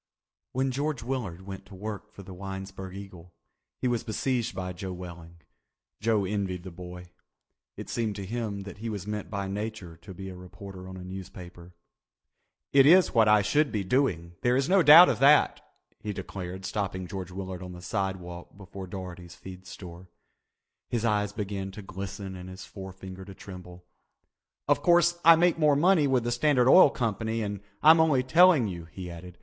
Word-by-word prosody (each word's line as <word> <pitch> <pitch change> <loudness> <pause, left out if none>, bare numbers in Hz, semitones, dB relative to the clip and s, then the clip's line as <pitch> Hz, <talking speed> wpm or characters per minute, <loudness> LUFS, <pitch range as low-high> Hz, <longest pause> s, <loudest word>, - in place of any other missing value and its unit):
When 130 +1 0
George 140 -2 -2
Willard 115 -9 -4
went 95 -1 -8
to 100 - -12
work 105 +2 -7
for 100 - -12
the 95 0 -10
Winesburg 95 0 -7
Eagle 90 -3 -11 0.4
he - - -1
was 120 -2 0
besieged 120 -1 -2
by 90 -1 -4
Joe 95 +1 -6
Welling. 85 -2 -10 0.6
Joe 105 -2 +1
envied 95 -3 -3
the 95 - -8
boy. 90 0 -10 0.7
It - - -7
seemed 110 -3 -2
to 100 -1 -6
him 105 -1 -4
that 100 0 -10
he 115 +1 -4
was 100 -4 -5
meant 105 0 -4
by 100 -2 -3
Nature 100 -3 -5
to 95 +4 -11
be 95 +2 -7
a 95 - -8
reporter 95 +1 -10
on 95 - -8
a 90 - -8
newspaper. 90 -1 -10 1.0
"It 135 0 +7
is 180 +3 +6
what 115 -3 +5
I 105 -1 +5
should 145 +8 +2
be 105 -2 -1
doing, 95 - 0
there 125 0 +2
is 135 +1 +1
no 195 0 +5
doubt 165 +3 +10
of - - 0
that," 145 +3 +5 0.4
he 105 - -4
declared, 95 -1 -7
stopping 95 -2 -3
George 95 0 -6
Willard 95 0 -6
on 90 0 -8
the 90 - -10
sidewalk 90 -3 -4
before 95 -1 -9
Daugherty's 90 -2 -8
Feed 95 0 -11
Store. 90 -2 -10 0.8
His 115 -1 -1
eyes 105 -2 +1
began 100 -2 -4
to 105 - -9
glisten 95 0 -7
and 90 0 -9
his 95 0 -9
forefinger 95 -1 -9
to 95 0 -11
tremble. 90 -2 -11 0.8
"Of - - +3
course 175 0 +4
I 165 +1 +9
make 170 0 +2
more 150 -2 +4
money 165 0 +4
with 130 -3 +2
the 120 - -1
Standard 125 0 +3
Oil 165 +3 +8
Company 115 -2 -2
and 100 -1 -4 0.2
I'm 160 +2 +8
only 150 -5 +3
telling 165 -3 +5
you," 85 -4 -6
he 90 +1 -8
added. 90 +1 -10
100 Hz, 185 wpm, -28 LUFS, 90-120 Hz, 1.0 s, doubt